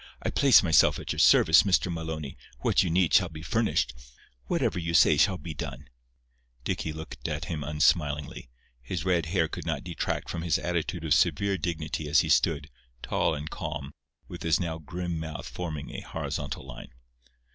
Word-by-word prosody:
I - - -1
place 135 -6 +6
myself 80 -3 +4
at - - -5
your - - -3
service, 80 0 +7
Mr. 95 -3 +1
Maloney. 80 -4 -5 0.3
What - - +3
you 90 - 0
need 90 0 +2
shall 90 -4 +5
be 80 -1 -9
furnished. 110 - 0 0.5
Whatever 90 - 0
you 85 0 -2
say 80 - +6
shall 95 +5 +3
be 80 +1 -7
done." 70 -1 -7 0.7
Dicky 80 - -2
looked 75 -6 -7
at 75 0 -3
him 80 -3 -4
unsmilingly. 75 -3 0 0.3
His 80 +7 -4
red 85 -4 +1
hair 85 -2 +1
could - - -7
not - - -2
detract 85 -2 -3
from - - -4
his 85 -3 +1
attitude 85 -1 -3
of 80 - +3
severe 90 +5 +2
dignity 80 -3 -3
as - - +5
he - - -3
stood, 75 -2 +2 0.3
tall - - 0
and 75 +1 -6
calm, 75 -6 -5 0.4
with 85 - -9
his 80 -1 +2
now 80 -2 -3
grim 85 +2 -4
mouth 80 -1 -6
forming 80 -5 -6
a - - -6
horizontal - - -5
line. - - -11
80 Hz, 180 wpm, -27 LUFS, 75-85 Hz, 0.7 s, service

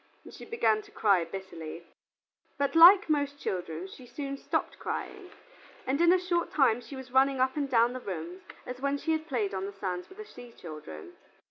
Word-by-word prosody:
and - - -13
she - - -10
began 220 - +1
to - - -18
cry 200 -5 +2
bitterly. 170 -2 -8 0.7
But 280 -1 0
like 360 +5 +9
most 285 -2 0
children, 175 - -4
she 250 +6 -13
soon 275 +3 -5
stopped 275 - -3
crying, 390 -3 -5 0.6
and 275 +5 0
in 345 0 +6
a 370 - +6
short 355 -1 -1
time 245 -5 +3
she 275 - -10
was 265 -1 -9
running 265 +1 +3
up 260 0 +2
and 285 -2 -2
down 240 -1 +3
the 255 - -5
rooms 180 -3 -6 0.2
as 250 +1 -7
when 280 +1 0
she 320 - -2
had 315 0 -1
played 220 -9 -1
on 190 0 -3
the 200 - -8
sands 185 -2 -4
with 380 - -15
the 430 - -8
sea 245 - -13
children. 150 - -10
255 Hz, 205 wpm, -29 LUFS, 190-285 Hz, 0.7 s, like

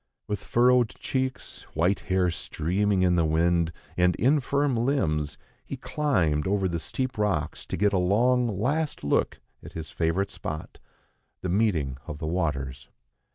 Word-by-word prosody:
With 105 -1 -3
furrowed 125 -1 +4
cheeks, 130 -1 -3
white 90 +5 +2
hair 95 -1 +1
streaming 95 +5 0
in 90 -1 +3
the 85 - +3
wind, 85 +1 +2 0.2
and 90 0 +3
infirm 140 +1 +2
limbs, 80 - 0 0.3
he - - -6
climbed 90 - 0
over 100 -1 +1
the 85 -2 -2
steep 130 +7 -3
rocks 95 -8 -1
to - - -3
get 105 0 +2
a 95 - +3
long, 120 +7 +3
last 135 +10 -1
look 70 - +1 0.2
at - - -11
his 80 -1 -6
favourite 85 +4 0
spot, 80 0 -6 0.6
the 90 - -3
meeting 85 - +1
of 75 - -5
the 80 - -5
waters. 70 -7 -2
95 Hz, 150 wpm, -27 LUFS, 80-120 Hz, 0.6 s, furrowed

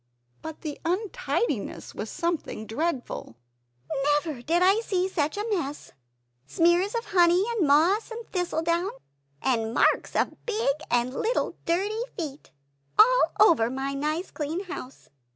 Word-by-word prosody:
But 320 -1 -8
the 300 -3 -5
untidiness 380 - -2
was 215 - -5
something 335 -10 -3
dreadful 260 - -3 0.9
"Never 295 -7 -5
did 335 +7 +2
I 390 +4 +5
see 375 -5 0
such 315 -2 -1
a 415 - -2
mess 295 -6 -3 0.6
smears 345 - +2
of 465 - -2
honey; 355 0 +4
and 415 -10 +1
moss, 335 +10 +4
and 460 0 -7
thistledown 345 0 0 0.5
and 230 -3 0
marks - - +2
of - - -1
big 430 -11 +1
and 245 +1 +1
little 460 - -1
dirty 400 +6 0 0.2
feet 300 -5 -6 0.5
all - - +6
over 320 - +5
my 270 +2 -3
nice 305 +6 -2
clean 315 +5 -3
house!" 275 -8 -8
340 Hz, 135 wpm, -26 LUFS, 280-395 Hz, 0.9 s, all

